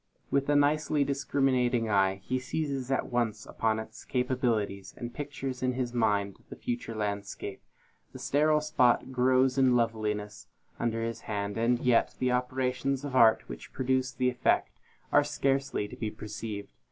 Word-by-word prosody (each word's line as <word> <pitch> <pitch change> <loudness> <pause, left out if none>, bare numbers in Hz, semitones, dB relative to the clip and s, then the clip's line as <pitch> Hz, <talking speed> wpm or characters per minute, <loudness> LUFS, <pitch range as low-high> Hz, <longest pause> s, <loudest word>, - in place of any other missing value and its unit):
With 140 0 +1
a 145 - +4
nicely 145 0 +3
discriminating 130 -4 +1
eye, 95 -2 +2
he 130 +4 -1
seizes 135 -1 -3
at 135 - -1
once 115 -3 -1
upon 110 -1 0
its 110 - -8
capabilities, 115 -6 -1
and 120 0 -6
pictures 135 -3 -5
in 130 0 +1
his 125 -1 -2
mind 100 -4 +1
the - - -7
future 120 -2 -4
landscape. 100 -2 -4 0.5
The - - -9
sterile 150 +2 +2
spot 130 -4 +2
grows 130 +1 +3
into 130 -2 +5
loveliness 105 -3 -1 0.3
under 115 -1 -1
his 115 0 -3
hand; 100 -1 -2
and 115 +2 +2
yet 120 -1 +2
the 125 0 +1
operations 130 +2 -1
of 135 -2 -4
art 115 -3 +5
which - - -9
produce 130 0 0
the 125 0 +1
effect 125 - +1 0.4
are - - +6
scarcely 135 -5 0
to - - -9
be 110 - -3
perceived. 105 -1 -7
125 Hz, 155 wpm, -29 LUFS, 110-130 Hz, 0.5 s, are